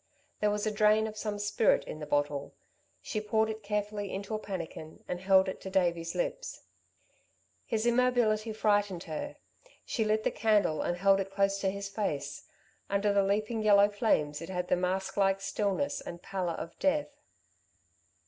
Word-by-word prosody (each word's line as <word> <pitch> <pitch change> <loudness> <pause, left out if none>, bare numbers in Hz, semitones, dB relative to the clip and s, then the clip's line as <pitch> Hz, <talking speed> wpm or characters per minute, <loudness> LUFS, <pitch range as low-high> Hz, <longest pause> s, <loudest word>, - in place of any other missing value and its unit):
There 210 - +2
was 210 0 -1
a 215 - +1
drain 215 +1 +4
of 215 -1 -5
some 210 -1 -3
spirit 205 +2 +2
in 155 - -7
the 150 - -6
bottle. 145 -1 -1 0.5
She 215 - -3
poured 220 +1 +1
it 220 0 -7
carefully 205 -1 -2
into 200 +3 -5
a 215 - -1
pannikin 165 -6 -7
and 180 - -3
held 190 0 +4
it 190 - -5
to 190 - -6
Davey's 175 -3 0
lips. - - -3 1.0
His 220 0 0
immobility 240 -3 +2
frightened 205 -4 +1
her. 155 -2 -5 0.5
She 225 - 0
lit 215 0 +1
the - - +1
candle 210 -7 +2
and 175 - -1
held 195 +1 +4
it 195 0 -2
close 195 0 +1
to 195 - +1
his 200 +1 -4
face. 195 -9 -3 0.4
Under 200 +1 +2
the 200 - +4
leaping 215 +3 0
yellow 205 -1 +6
flames 155 -9 +1
it 165 - -7
had 180 -1 -3
the - - +4
mask 190 +2 -2
like 195 -1 +3
stillness 200 +6 -1
and 170 0 -8
pallor 185 -3 -2
of 170 - -7
death. 290 0 0
200 Hz, 175 wpm, -30 LUFS, 190-215 Hz, 1.0 s, yellow